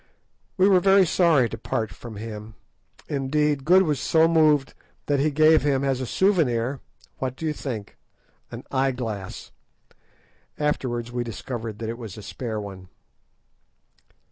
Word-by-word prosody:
We 190 +1 +5
were 190 -2 +5
very 195 +1 +5
sorry 160 -7 +3
to - - -7
part 110 -1 -2
from 115 +1 -10
him; 105 0 -8 0.5
indeed, 145 0 0
Good 185 +3 +6
was 150 -6 0
so 160 +3 +3
moved 155 -4 +3 0.3
that 145 -1 +1
he 150 +3 +2
gave 155 +2 +5
him 140 -2 +1
as 135 -2 0
a 130 - -3
souvenir—what 130 - -1
do 160 - -6
you 155 - 0
think?—an 115 -8 -9
eye 135 0 +1
glass; 110 -6 -6 1.1
afterwards 120 -5 -2
we 120 0 -2
discovered 115 -1 -6
that 110 0 -5
it 115 +1 -5
was 110 -5 -8
a 105 - -9
spare 110 +1 -5
one. 95 -3 -9
135 Hz, 145 wpm, -24 LUFS, 115-155 Hz, 1.1 s, Good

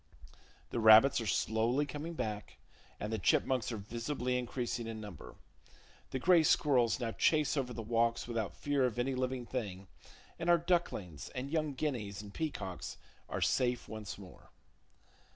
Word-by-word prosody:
The - - -1
rabbits 110 +4 +7
are 115 - -4
slowly 115 +8 +1
coming 150 +4 -6
back, 105 -6 -4 0.4
and 105 +1 -3
the 110 - -1
chipmunks 125 +6 +2
are 115 - -3
visibly 120 +5 -3
increasing 120 -1 -2
in 110 -1 -5
number. 105 -7 -9 0.7
The - - -2
gray 170 +5 +5
squirrels 130 -7 +3
now 115 -2 -2
chase 150 +5 +2
over 130 -3 -1
the 115 -1 -5
walks 115 +1 +1
without 115 -3 -2
fear 140 -3 +1
of 120 - -5
any 130 +2 0
living 130 -1 -2
thing, 100 -7 -4 0.5
and 170 +1 -1
our 175 - +7
ducklings 165 - -1
and 135 +2 -4
young 155 -3 0
guineas 120 -9 -3
and 105 -1 -9
peacocks 95 - -4 0.3
are - - -3
safe 125 -1 +1
once 110 -2 -6
more. 95 -2 -14
120 Hz, 155 wpm, -33 LUFS, 110-140 Hz, 0.7 s, rabbits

